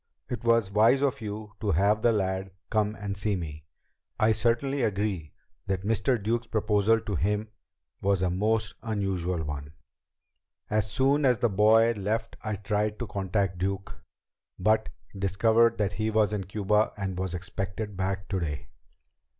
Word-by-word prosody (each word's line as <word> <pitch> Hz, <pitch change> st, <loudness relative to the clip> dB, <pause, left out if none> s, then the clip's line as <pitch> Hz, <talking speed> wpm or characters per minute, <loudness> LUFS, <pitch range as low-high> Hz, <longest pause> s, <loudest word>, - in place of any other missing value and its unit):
"It 120 Hz, -2 st, -4 dB
was 115 Hz, -4 st, +3 dB
wise 115 Hz, +7 st, +4 dB
of 135 Hz, -5 st, 0 dB
you 105 Hz, 0 st, -6 dB
to 105 Hz, -, -1 dB
have 100 Hz, +5 st, +3 dB
the 120 Hz, -, +4 dB
lad 95 Hz, -2 st, -1 dB, 0.2 s
come 105 Hz, 0 st, +1 dB
and 100 Hz, -1 st, -4 dB
see 100 Hz, +1 st, 0 dB
me. 75 Hz, -4 st, -6 dB, 0.5 s
I 110 Hz, -1 st, +4 dB
certainly 120 Hz, +5 st, +1 dB
agree 100 Hz, -7 st, -1 dB, 0.3 s
that 95 Hz, -1 st, -1 dB
Mr. 115 Hz, +4 st, +1 dB
Duke's 115 Hz, +3 st, -1 dB
proposal 110 Hz, 0 st, +2 dB
to 105 Hz, -, -4 dB
him 105 Hz, +4 st, 0 dB, 0.5 s
was 100 Hz, -1 st, +2 dB
a 90 Hz, -, +1 dB
most 110 Hz, +3 st, 0 dB
unusual 95 Hz, -6 st, -1 dB
one. 75 Hz, 0 st, -6 dB, 1.0 s
As 105 Hz, 0 st, +1 dB
soon 135 Hz, +7 st, +2 dB
as 125 Hz, -3 st, +4 dB
the 120 Hz, -, +2 dB
boy 110 Hz, +3 st, +5 dB
left 110 Hz, +2 st, -2 dB
I 110 Hz, -2 st, -2 dB
tried 105 Hz, +1 st, -1 dB
to 120 Hz, -, -3 dB
contact 95 Hz, -3 st, -1 dB
Duke, 95 Hz, +1 st, -3 dB, 0.6 s
but 110 Hz, +1 st, +2 dB, 0.3 s
discovered 110 Hz, +5 st, +3 dB
that 105 Hz, -1 st, 0 dB
he 110 Hz, +3 st, -1 dB
was 105 Hz, -1 st, +2 dB
in 100 Hz, -3 st, -2 dB
Cuba 105 Hz, +2 st, +1 dB
and 95 Hz, -2 st, -3 dB
was 95 Hz, -1 st, -2 dB
expected 100 Hz, +3 st, -4 dB
back 95 Hz, +1 st, -2 dB
today." 85 Hz, -7 st, -3 dB
105 Hz, 155 wpm, -28 LUFS, 95-110 Hz, 1.0 s, boy